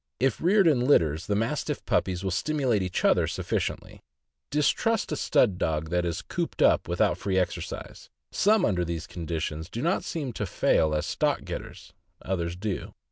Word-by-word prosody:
If 130 -2 +1
reared 195 +3 +4
in 150 -6 +4
litters, 85 - +2
the 100 - +1
Mastiff 115 +2 -2
puppies 90 -1 0
will 95 - -1
stimulate 125 - +1
each 90 -1 -2
other - - +4
sufficiently. - - -3 0.5
Distrust 155 +10 +1
a - - 0
stud 100 -8 +2
dog 80 0 -1
that 90 0 +1
is 85 -1 -3
cooped - - -2
up - - +4
without - - +1
free 95 -1 -1
exercise; 90 - -3 0.2
some 215 +2 +3
under 90 -3 +1
these 85 -1 -3
circumstances 80 -2 -4
do 120 - -5
not 170 +3 +1
seem 145 -8 -4
to 105 - -3
fail 80 -3 +2
as 75 - -1
stock - - 0
getters, - - -8 0.3
others 85 -2 -3
do. 100 +1 -4
95 Hz, 170 wpm, -27 LUFS, 85-135 Hz, 0.5 s, reared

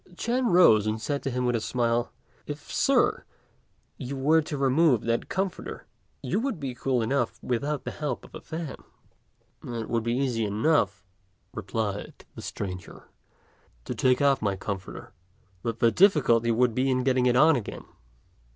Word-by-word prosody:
Ch'ên 240 +3 0
rose 110 - +6
and 110 +1 -1
said 140 +6 -2
to - - -2
him 125 0 -1
with 120 -1 +1
a 115 - -1
smile, 120 0 0 0.4
"If - - -7
Sir, - - +2 0.8
you 135 +2 -5
were 155 +4 +4
to 150 -1 -5
remove 135 -1 +3
that 115 0 -1
comforter, 190 -1 -4 0.4
you - - 0
would 245 -7 -2
be 135 -3 -4
cool 125 -1 0
enough 120 0 -1
without 140 +4 -2
the - - -4
help 150 -1 -4
of - - -17
a - - -8
fan." 160 -3 -6 0.9
"It 115 -2 -5
would 115 -1 +1
be 115 +1 -1
easy 125 -4 0
enough," 105 - +1 0.5
replied 105 0 -4
the - - -9
stranger, 90 -3 -7 0.8
"to - - -3
take 130 +1 +2
off 140 -2 +3
my 100 -2 0
comforter; 95 0 -6 0.5
but 115 +2 -3
the 115 0 +3
difficulty 135 - +4
would 120 +1 +2
be 130 +3 +1
in 130 -1 +1
getting 130 -1 +2
it 125 - +3
on 155 +5 +6
again." 115 -6 -5
125 Hz, 165 wpm, -27 LUFS, 115-145 Hz, 0.9 s, rose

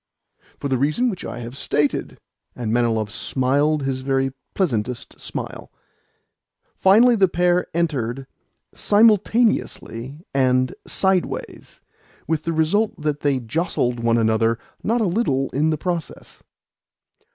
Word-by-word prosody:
"For - - -4
the 130 -2 0
reason 155 - +1
which 185 - -7
I - - -6
have 120 +2 -8
stated." 145 +1 -1 0.4
And 115 -3 -3
Manilov 115 -3 +1
smiled 140 +6 +1
his 135 -1 -2
very 135 0 0 0.2
pleasantest 125 - -2
smile. - - -6 1.0
Finally 230 +5 +5
the 195 -2 +5
pair 175 0 +1
entered 135 -6 -1 0.5
simultaneously 205 - +1
and 130 -1 +2
sideways; 190 -2 -1 0.5
with 155 0 -1
the 165 - 0
result 165 +8 +1
that 150 -1 -1
they 140 -3 +1
jostled 125 - -1
one 115 0 +2
another 115 0 +2 0.2
not 230 +2 0
a - - +2
little 170 - 0
in 150 +4 +1
the 155 - 0
process. 170 0 -5
145 Hz, 120 wpm, -22 LUFS, 125-180 Hz, 1.0 s, Finally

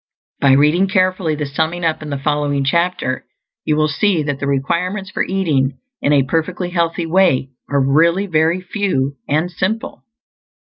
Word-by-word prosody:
By 140 -2 +4
reading 150 +7 +4
carefully 185 -4 +1
the 150 0 -3
summing 160 +5 -2
up 160 -1 0
in 155 - -7
the 140 - -2
following 145 0 0
chapter, 170 -3 0 0.4
you 155 - +2
will 155 0 +2
see 175 +1 +1
that 145 -2 -3
the 140 - -2
requirements 180 +8 -1
for - - -1
eating 150 -9 0 0.2
in 145 - +1
a 140 -2 +4
perfectly 175 +4 -2
healthy 170 -1 0
way 165 -7 +2 0.2
are 145 - +1
really 165 +8 +3
very 165 0 +1
few 180 -9 -1
and 155 +5 0
simple. 215 +5 -3
160 Hz, 165 wpm, -18 LUFS, 140-180 Hz, 0.4 s, By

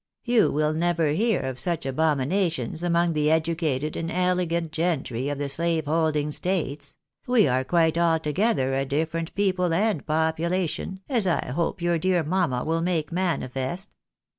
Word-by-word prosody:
You 240 -2 +3
will 150 +1 +1
never 165 -1 +1
hear 220 +10 +1
of 130 -1 -4
such 170 +5 -1
abomina 155 +6 +1
tions 155 +1 -5
among 170 -1 +2
the 150 -1 +1
educated 155 -3 0
and 165 - -3
elegant 175 -2 0
gentry 145 -6 -1
of 145 - -3
the 145 0 -2
slave 165 +2 -1
holding 155 -1 +1
states 150 -5 -2
— - - -62
we 245 -5 +4
are 130 0 +1
quite 165 +3 +2
altogether 165 - +1
a 135 0 +1
different 160 +4 -2
people 185 -3 +1
and 205 -5 +1
population, 165 +4 -1
as 235 -8 +1
I 175 - 0
hope 170 +4 -2
your 175 -1 +1
dear 180 0 +1
mamma 155 -6 0
will 165 +1 0
make 165 -4 -1
manifest. 175 0 -2
165 Hz, 160 wpm, -25 LUFS, 150-180 Hz, -, we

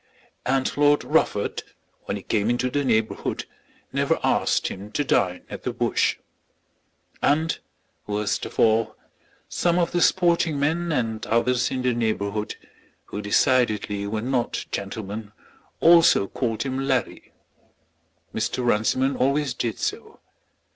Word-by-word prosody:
And 130 0 +1
Lord 145 0 +4
Rufford, - - +1 0.4
when 100 - -2
he 100 - -10
came 105 0 0
into 125 +1 0
the 145 +1 0
neighbourhood, 110 -4 0 0.5
never - - +1
asked - - +1
him 100 +2 -8
to 145 - +1
dine 90 -9 +1
at - - -8
the - - -2
Bush. - - +1 1.0
And 160 +3 +1 0.5
worst 105 0 -1
of - - -11
all, 110 -1 +3 0.5
some 175 0 +1
of 170 -1 +1
the 175 - 0
sporting 170 -5 +3
men 165 +4 0
and 115 -6 -1
others 120 +2 +2
in 130 -1 -3
the 125 -1 +2
neighbourhood, 105 -2 -2 0.5
who 105 - -6
decidedly 105 -2 +1
were 110 +1 -3
not 125 -1 -1
gentlemen, 105 +1 -5 0.5
also 165 -11 +6
called 115 -2 -2
him 135 -1 -3
"Larry." 135 -3 -2 1.0
Mr. 115 +3 -2
Runciman 120 +4 +2
always 140 +1 +1
did 115 -3 -3
so. - - -4
120 Hz, 130 wpm, -24 LUFS, 110-140 Hz, 1.0 s, also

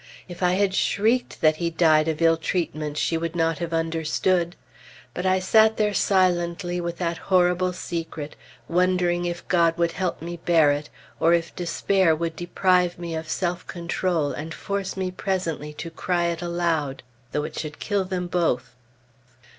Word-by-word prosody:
If 175 0 -10
I 180 0 +3
had 195 0 +2
shrieked 225 +6 +1
that 155 -1 +4
he 170 0 -1
died 160 -2 +3
of 160 +1 -1
ill 165 0 +5
treatment, 155 -3 -2
she 165 +1 0
would 165 0 -3
not 165 -2 +1
have 170 -1 -3
understood. 165 +2 0 0.6
But 180 +1 -2
I 185 0 +4
sat 220 +4 +4
there 210 -1 +1
silently 175 -2 +1
with 170 0 -4
that 170 -2 -2
horrible 180 0 +3
secret, 165 -4 -5 0.3
wondering 180 0 +1
if 175 0 -4
God 170 -1 +3
would 170 -1 +1
help 185 0 -2
me 170 +1 -6
bear 165 -3 +4
it, 145 +1 -3 0.3
or 165 +1 +4
if 170 0 -3
despair 175 0 +2
would 165 0 -3
deprive 180 +1 +1
me 170 -1 -5
of 160 0 -5
self 180 0 -2
control 170 -3 -1
and 160 +2 -6
force 200 -1 -3
me 185 -1 -2
presently 180 -6 -2
to 165 +2 -7
cry 175 +1 0
it 170 0 -3
aloud, 170 -6 -1 0.3
though 150 - -1
it - - -5
should 150 -1 -5
kill 205 -2 0
them 185 -1 -3
both. 170 -9 0
170 Hz, 170 wpm, -24 LUFS, 165-180 Hz, 0.6 s, ill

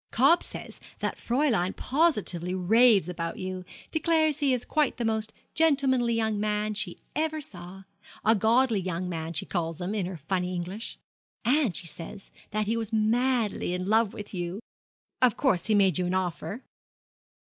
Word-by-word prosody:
'Cobb 275 +9 +5
says - - -7 0.2
that - - -2
Fräulein 235 -8 +1
positively 210 - +1
raves 210 +1 +5
about 165 -2 -4
him 185 0 -4 0.3
declares 315 -2 +2
he 285 -3 +2
is 250 -2 0
quite 300 -4 +1
the 240 - -2
most 220 -1 -1 0.2
gentlemanly 270 -6 +3
young 220 -2 0
man 210 0 0
she 205 -4 -3 0.2
ever 315 0 0
saw 190 -7 -9 0.4
a 220 - +6
godly 230 +1 +3
young 180 -1 -3
man 165 -2 -4
she - - -2
called 165 -3 -2
him, 180 +3 -3
in 200 -5 -1
her 185 -2 -6
funny 180 +4 -2
English. 185 +6 -5 0.5
And, 260 - +2
she 190 - -2
says, 165 +4 -9 0.2
that 215 0 -1
he 220 +3 0
was 225 -2 -2
madly 225 -3 +1
in 180 0 -3
love 220 +1 +3
with 205 0 -9
you. 175 +1 -3 0.6
Of 250 -4 +4
course 210 - +1
he 215 - +3
made 195 -2 +4
you 180 - 0
an 180 - 0
offer?' 185 +6 -3
210 Hz, 165 wpm, -27 LUFS, 180-250 Hz, 0.6 s, a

